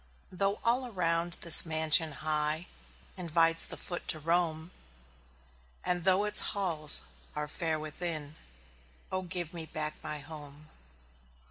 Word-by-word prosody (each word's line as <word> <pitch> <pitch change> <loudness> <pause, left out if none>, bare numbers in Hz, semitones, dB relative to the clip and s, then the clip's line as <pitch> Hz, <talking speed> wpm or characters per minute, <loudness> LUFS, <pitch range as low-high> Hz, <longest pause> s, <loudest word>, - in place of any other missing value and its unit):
Though 195 +2 -4
all 250 +2 -2
around 170 -4 -3
this 170 - +11
mansion 160 0 +2
high 155 +2 -1 0.5
Invites 165 -1 +3
the - - -5
foot 175 - -7
to - - +1
roam, 165 +1 -3 1.1
And 180 -1 -3
though 190 +1 +2
its 210 0 +1 0.2
halls 160 -7 +3 0.3
are 150 0 -5
fair 160 0 -4
within 155 -1 -5 0.8
Oh, 185 - -4
give 175 -2 -6
me 165 -2 -9
back 155 -1 -4
my 155 -1 -6
HOME! 150 0 -14
165 Hz, 125 wpm, -27 LUFS, 155-180 Hz, 1.1 s, this